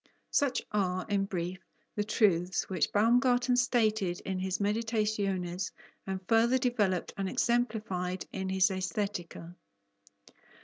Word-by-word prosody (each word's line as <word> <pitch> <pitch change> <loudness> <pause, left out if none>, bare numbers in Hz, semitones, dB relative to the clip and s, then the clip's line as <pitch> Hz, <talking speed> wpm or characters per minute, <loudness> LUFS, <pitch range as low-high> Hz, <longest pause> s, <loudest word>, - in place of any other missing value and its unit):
Such 280 -3 +1
are, 185 -3 0
in 200 -1 +1
brief, 180 -2 -4 0.4
the 210 - 0
truths 195 -4 +2
which 185 -4 0
Baumgarten 245 +3 +3
stated 220 -7 +1
in 190 -1 -3
his 185 0 -1
Meditationes, 205 -4 -1 0.4
and 190 0 -2
further 230 +3 +4
developed 215 -8 0
and 195 -1 -1
exemplified 210 -8 -1
in 190 -1 -3
his 190 +1 +3
Aesthetica. 185 -2 -4
200 Hz, 115 wpm, -30 LUFS, 185-225 Hz, 0.4 s, further